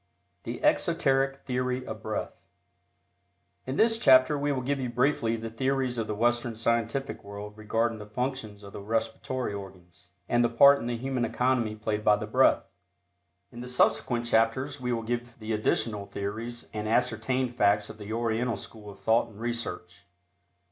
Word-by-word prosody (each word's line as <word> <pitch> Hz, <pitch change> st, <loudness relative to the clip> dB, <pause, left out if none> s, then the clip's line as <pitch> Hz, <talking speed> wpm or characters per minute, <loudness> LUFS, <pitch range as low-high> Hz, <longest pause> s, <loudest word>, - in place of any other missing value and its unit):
THE -, -, -5 dB
EXOTERIC 135 Hz, 0 st, +2 dB
THEORY 125 Hz, 0 st, -1 dB
OF 110 Hz, -2 st, -7 dB
BREATH. 110 Hz, -1 st, -3 dB, 1.3 s
In 130 Hz, -, -2 dB
this 225 Hz, +4 st, +3 dB
chapter 130 Hz, -, +6 dB
we 145 Hz, 0 st, 0 dB
will 130 Hz, -2 st, -2 dB
give 140 Hz, +2 st, -1 dB
you 125 Hz, -2 st, -2 dB
briefly 120 Hz, -2 st, +1 dB
the 115 Hz, 0 st, -6 dB
theories 130 Hz, 0 st, -1 dB
of 110 Hz, -, -2 dB
the 105 Hz, -, -2 dB
Western 120 Hz, +1 st, +1 dB
scientific 115 Hz, +4 st, -1 dB
world 100 Hz, +1 st, -8 dB
regarding 115 Hz, +1 st, -1 dB
the 105 Hz, -, -9 dB
functions 110 Hz, -3 st, -4 dB
of 100 Hz, -, -11 dB
the -, -, -7 dB
respiratory 115 Hz, +2 st, -2 dB
organs, 90 Hz, -3 st, -11 dB, 0.2 s
and 120 Hz, 0 st, +3 dB
the 120 Hz, -, +3 dB
part 140 Hz, +4 st, +7 dB
in 120 Hz, -, -4 dB
the 120 Hz, -1 st, -2 dB
human 130 Hz, 0 st, -2 dB
economy 120 Hz, -2 st, +1 dB
played 105 Hz, 0 st, -2 dB
by 105 Hz, -, +5 dB
the 105 Hz, +1 st, -4 dB
breath. 125 Hz, +2 st, +4 dB, 0.9 s
In 120 Hz, 0 st, -8 dB
subsequent 120 Hz, -1 st, +2 dB
chapters 130 Hz, +5 st, +1 dB
we 125 Hz, -1 st, -1 dB
will 115 Hz, -1 st, -1 dB
give 120 Hz, +1 st, -4 dB
the 110 Hz, 0 st, -4 dB
additional 105 Hz, -1 st, 0 dB
theories 110 Hz, +4 st, -5 dB
and 105 Hz, 0 st, -3 dB
ascertained 125 Hz, +2 st, 0 dB
facts 105 Hz, -1 st, +2 dB
of 110 Hz, -, -15 dB
the 105 Hz, +1 st, -7 dB
Oriental 115 Hz, 0 st, 0 dB
school 105 Hz, +1 st, -10 dB
of 100 Hz, -, -11 dB
thought 115 Hz, +1 st, +2 dB
and 110 Hz, -2 st, -15 dB
research. 115 Hz, -7 st, -5 dB
115 Hz, 170 wpm, -28 LUFS, 110-125 Hz, 1.3 s, part